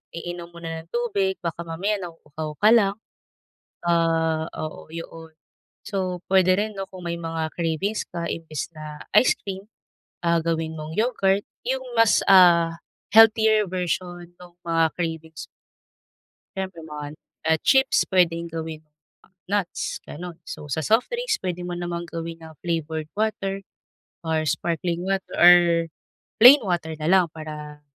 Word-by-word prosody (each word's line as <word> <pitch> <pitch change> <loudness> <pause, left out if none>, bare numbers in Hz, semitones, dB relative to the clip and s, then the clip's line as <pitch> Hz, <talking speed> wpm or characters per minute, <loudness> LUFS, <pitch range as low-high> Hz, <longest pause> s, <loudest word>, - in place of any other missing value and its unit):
iinom 175 0 -6
muna 165 -1 -6
ng 165 - -29
tubig 200 -6 0
baka 170 0 -3
mamaya 195 +6 -1
nauuhaw 155 -3 -7
ka 210 - +6
lang, 200 -4 +4 0.9
ah, 165 -1 +2
oo 155 0 -7
yoon. 165 -1 -9 0.5
So, 185 -3 -2
puwede 185 -1 +5
rin 215 +2 -1
'no 195 0 -5
kung 185 -1 -10
may 170 0 -2
mga 165 -1 -3
cravings 170 +5 -1
ka 170 -1 -4
imbes 160 -2 -5
na 150 -1 -8
ice - - +6
cream, 195 +1 -7 0.6
ah, 170 0 +3
gawin 160 -1 -2
mong 155 +1 -7
yogurt 205 -4 +2 0.2
yung 260 +1 -1 0.2
mas, 230 -1 +5
ah, 170 -3 +6 0.3
healthier 220 -1 +6
version 175 -1 -3
nung 175 -1 -14
mga 165 -1 +2
cravings. 160 -2 -5 1.1
Siyempre 185 -4 -5
naman 150 -1 -7 0.2
at 160 0 +2
chips 265 0 +4
puwedeng 170 -3 +2
gawin 160 -1 -5 0.7
nuts 200 -3 -2
ganun, 170 +1 -8
so - - -7
sa 160 - 0
soft 225 +3 +2
drinks 480 -1 0
puwede 180 -2 -3
mo 175 - -4
namang 175 0 -4
gawin 165 0 -6
na 160 -1 -12
flavored 160 -2 -3
water 195 -3 -1 0.7
or 160 -1 +1
sparkling 170 +2 -1
water 195 0 -1
or 175 0 +9 0.8
plain 260 +5 +10
water 170 -4 -2
nalang 175 +4 +3
para 150 -2 -9
170 Hz, 135 wpm, -24 LUFS, 160-190 Hz, 1.1 s, plain